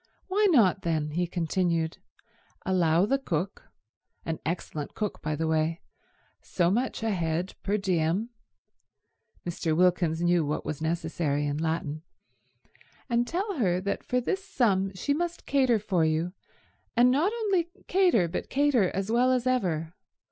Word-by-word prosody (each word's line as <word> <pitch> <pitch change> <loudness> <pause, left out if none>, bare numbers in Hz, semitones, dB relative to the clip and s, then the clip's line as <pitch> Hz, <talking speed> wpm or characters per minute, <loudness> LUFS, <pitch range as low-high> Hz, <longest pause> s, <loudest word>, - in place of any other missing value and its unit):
"Why 410 +2 +3
not, 205 - +4
then," 155 -3 -1
he 175 +3 0
continued, 170 -1 -1 0.7
"allow 175 -1 +3
the 275 +6 +1
cook—an 165 - -6
excellent 155 -2 -4
cook, 210 -2 -3
by 155 -1 -2
the 160 +2 -2
way—so 160 +2 -2
much 240 +2 -1
a 225 - +1
head 175 0 -1
per 205 +2 0
diem"—Mr. 175 -3 -4
Wilkins 175 -2 +2
knew 175 -1 +3
what 150 +1 -2
was 155 0 -4
necessary 160 -3 -1
in 145 0 -1
Latin—"and 165 - -5
tell 380 -1 -2
her 180 -5 +2
that 200 +2 -3
for 250 - 0
this 380 +10 -2
sum 195 - +1
she 285 +9 0
must 345 +3 -3
cater 260 -4 +3
for 195 -5 0
you, 160 +3 0 0.6
and 245 +1 +6
not 310 +10 +2
only 400 -7 0 0.2
cater 355 - +3
but 165 - -4
cater 265 -8 +3
as 195 +3 -2
well 250 +2 +4
as 250 -1 +1
ever? 175 -11 0
185 Hz, 135 wpm, -28 LUFS, 160-245 Hz, 0.7 s, and